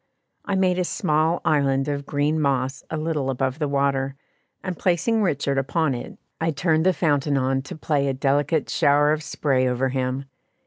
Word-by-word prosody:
I 200 - -1
made 185 -1 +2
a - - +2
small 160 -1 0
island 135 -2 +2
of 140 -1 -3
green 150 +2 0
moss 135 -2 0
a 160 - -3
little 155 -3 -1
above 130 +2 -1
the 150 - 0
water, 140 -1 0 0.5
and, 185 -2 -3
placing 185 +7 +1
Richard 140 -7 0
upon 145 +2 0
it, 120 - -7 0.2
I 165 - 0
turned 160 +2 +1
the - - +6
fountain 145 -5 +1
on 135 0 +1
to 135 - -9
play 145 -2 0
a 135 - 0
delicate 145 +2 +1
shower 145 +1 +3
of 155 0 0
spray 135 -3 0
over 125 +1 0
him. 130 +1 -2
145 Hz, 180 wpm, -23 LUFS, 135-160 Hz, 0.5 s, the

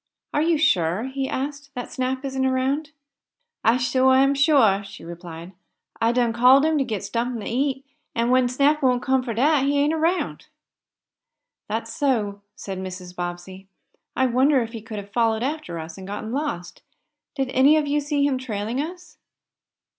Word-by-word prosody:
"Are 295 - +2
you 325 0 +2
sure," 180 - +2
he 265 +1 -3
asked, 280 +1 -4
"that 245 - -6
Snap 260 +1 -2
isn't 265 -1 -2
around?" 265 +4 0 0.7
"I 230 +2 +4
suah 260 +1 +3
am 275 +1 +4
suah," 275 -9 +4
she 195 -1 -11
replied. 170 0 -9 0.5
"I 225 +1 +3
done 240 -1 +1
called 255 +5 +6
him 315 -1 +2
to - - +2
git 220 -7 -4
suffin 240 0 -2
to 205 - -6
eat, 270 +2 -1 0.3
an' 235 +1 +1
when 255 -1 +4
Snap 285 +4 +2
won't 250 -2 +2
come 265 -1 +2
fo' 245 -2 -4
dat 275 +4 +3
he 285 0 +2
ain't 290 +2 +2
around." 330 +3 -1 1.2
"That's 225 +1 -3
so," 215 -8 0
said 190 -2 -6
Mrs. 185 -1 -7
Bobbsey. 175 +2 -6 0.5
"I 260 - +2
wonder 260 +2 +3
if 230 - -8
he 225 -2 -7
could 220 0 -8
have 200 0 -8
followed 225 -1 +1
after 270 - -3
us, 160 +3 -8
and 190 - -9
got 205 +2 -5
lost? 220 - -4 0.5
Did 270 -2 -1
any 280 +4 +5
of 305 - +1
you 290 +1 +1
see 290 -1 0
him 270 -3 0
trailing 230 +1 -3
us?" 355 +3 -8
255 Hz, 175 wpm, -23 LUFS, 210-280 Hz, 1.2 s, called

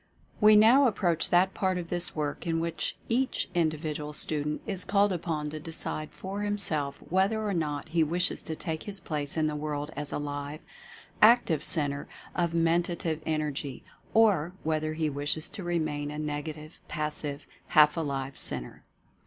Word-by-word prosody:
We 215 0 +7
now 240 +6 +7
approach 175 -7 +1
that 185 +2 +4
part 185 -2 0
of 170 -2 -5
this 175 -1 -2
work 150 +2 -3
in 165 -1 +1
which 165 0 -3
each 255 +3 0
individual 155 -2 -1
student 150 0 -2
is 195 -4 -1
called 200 -1 +2
upon 155 -4 -3
to 155 - -5
decide 155 -1 -4
for 195 +2 -6
himself 160 -9 +2
whether 205 +4 +2
or 200 - 0
not 150 -4 -2
he 165 -1 +3
wishes 175 +4 0
to 160 - -2
take 160 -1 -4
his 200 -1 -2
place 150 -4 -2
in 155 - +2
the 150 -1 -1
world 150 0 -3
as 150 -1 -4
a - - -2
Live, 145 +1 -5 0.6
Active 215 - +5
Centre 145 -3 +2 0.3
of 170 -2 0
Mentative 165 -1 +1
En 155 -1 +1
ergy, 140 -3 -4 0.3
or 195 -7 +4
whether 155 0 -1
he 160 -1 0
wishes 145 +2 -1
to 200 - -7
remain 155 -4 -1
a 150 - -6
Negative, 150 +1 -5
Passive, 150 -2 -3 0.2
Half 150 -1 +6
Alive 140 -4 -3
Centre. - - 0
155 Hz, 165 wpm, -28 LUFS, 150-180 Hz, 0.6 s, We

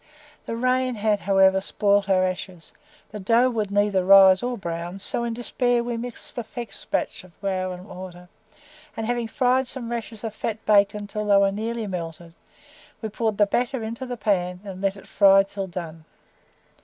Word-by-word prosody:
The 230 - -3
rain 255 +1 +1
had, 210 -1 +1
however, 190 0 +4
spoiled 200 0 +1
our 185 -1 +4
ashes, 185 -2 -6 0.4
the 210 - -6
dough 235 +6 +3
would 215 -4 -2
neither 200 -2 +2
rise 190 0 +7
nor 245 0 -2
brown, 170 -1 -5
so 195 +4 -1
in 235 -1 -2
despair 245 0 0
we 240 0 -3
mixed 240 +1 -4
a - - -3
fresh 225 -2 -9
batch - - -2
of 185 -2 -17
flour 185 -2 -2
and 180 +2 -12
water, 180 -2 -10 0.7
and 225 - -2
having 240 0 -1
fried 255 +3 +1
some 240 -2 -3
rashers 230 -2 -5
of 225 -2 -4
fat 220 0 -5
bacon 205 0 +3
till 210 +1 -4
they 200 -1 +5
were 200 0 +4
nearly 225 +2 -3
melted, 170 -3 -6 0.7
we 220 - -4
poured 220 0 -2
the 205 - +5
batter 245 +4 -1
into 230 +4 -5
the 245 -1 -5
pan 180 -4 -1
and 190 -1 -8
let 195 0 0
it - - -14
fry 195 -1 +6
till 195 0 -6
done. 165 -3 -7
205 Hz, 185 wpm, -24 LUFS, 190-230 Hz, 0.7 s, rise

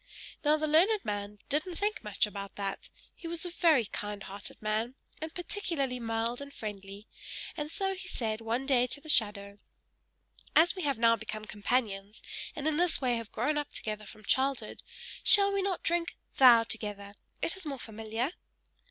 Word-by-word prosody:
Now 300 +1 +4
the 310 - -1
learned 370 +8 +4
man 205 0 -3
didn't 310 +5 0
think 420 +4 -1
much 210 0 +2
about 200 -1 -7
that; 195 -1 -4 0.2
he 335 - -9
was 335 +1 -1
a 355 - -4
very 320 -9 +4
kind 205 0 -5
hearted 200 +1 -8
man, 215 +4 -1 0.3
and 315 0 -4
particularly 330 -8 -2
mild 230 +2 -1
and 280 0 -8
friendly, 205 -3 -7 0.5
and 300 -2 -4
so 385 +4 -1
he 375 - -7
said 220 -2 -2
one 230 +4 -1
day 255 -3 +3
to 285 - -1
the 310 +2 -12
shadow: 205 -5 +3 1.0
"As 335 +4 +6
we 370 - -4
have 280 -6 0
now 230 0 +5
become 215 0 -5
companions, 210 -2 -1 0.3
and 300 -1 -2
in 310 -1 +1
this 350 0 +2
way 250 -3 +1
have 230 -3 -7
grown 295 +7 0
up 295 - -5
together 215 -1 -4
from 215 +1 -12
childhood, 270 +3 0 0.4
shall 400 -2 +7
we 395 - +1
not 380 -2 -1
drink 340 0 0 0.2
'thou' 240 -3 +8
together, 205 -3 -5 0.3
it 335 - +2
is 380 - -8
more 275 -2 -3
familiar?" 225 +4 -3
245 Hz, 180 wpm, -31 LUFS, 215-315 Hz, 1.0 s, thou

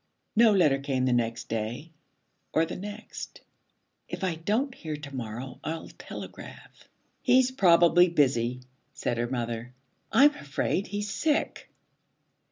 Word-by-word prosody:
No 225 0 +6
letter 150 -9 +4
came 135 -2 -1
the 125 - +2
next 115 -1 -1
day, 115 +8 -4 0.6
or 160 - +3
the 165 - -6
next. 205 +3 -8 0.7
'If - - -5
I 185 -2 +1
don't 215 - -1
hear 155 -7 -6
to 145 -1 -9
morrow, 125 +2 -6
I'll 160 +1 -4
telegraph.' - - -11 0.3
'He's 255 0 +4
probably 175 -5 +5
busy,' 125 -6 +1 0.3
said 120 - -2
her 120 - 0
mother. 120 -1 -4 0.4
'I'm 290 +2 +6
afraid 150 - -2
he's 205 +1 -3
sick.' 305 +5 -1
155 Hz, 130 wpm, -28 LUFS, 125-200 Hz, 0.7 s, No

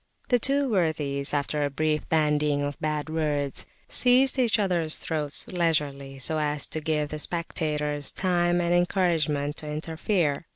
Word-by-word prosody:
The 245 -2 +4
two 275 +4 +2
worthies, 155 - 0
after 145 +1 -1
a 145 - 0
brief 155 +2 -1
bandying 150 -2 +2
of 145 0 -4
bad 150 -1 -2
words, 150 -3 -1 0.2
seized 260 +2 +4
each 235 -3 +3
other's 175 -6 +1
throats 150 -3 0
leisurely, 145 -6 -1
so 155 +4 0
as 150 -1 0
to 155 - -2
give 150 -1 -1
the 155 - -5
spectators 150 -3 -1
time 175 -2 +1
and 170 0 +1
encouragement 165 -5 +1
to 150 - -6
interfere. 160 0 -1
155 Hz, 150 wpm, -26 LUFS, 145-175 Hz, 0.2 s, The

